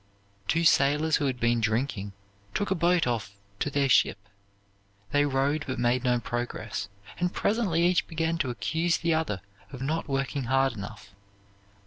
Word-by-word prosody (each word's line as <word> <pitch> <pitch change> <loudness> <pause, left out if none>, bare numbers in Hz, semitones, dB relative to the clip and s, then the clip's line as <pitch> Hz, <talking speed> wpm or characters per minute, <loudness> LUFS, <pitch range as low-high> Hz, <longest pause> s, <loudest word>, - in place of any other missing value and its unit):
Two 165 +1 +2
sailors, 150 0 +4
who 145 - 0
had 130 -2 -2
been 120 0 +2
drinking, 110 -2 -1 0.4
took 205 - -1
a - - +6
boat 175 -1 +2
off 110 -5 -2 0.2
to - - 0
their 140 -1 +1
ship. 125 - +4 0.9
They 145 0 +3
rowed 140 +3 +1
but 130 - -3
made 120 +1 +1
no 125 -1 +2
progress; 115 -4 -4 0.3
and 180 0 +1
presently 200 -8 +1
each 175 0 +3
began 165 0 -1
to 130 - 0
accuse 165 +7 0
the 170 -1 +1
other 155 - -1 0.3
of 130 - -8
not 160 +4 -1
working 135 0 -1
hard 135 +1 +2
enough. 105 -1 -9
135 Hz, 160 wpm, -27 LUFS, 120-165 Hz, 0.9 s, a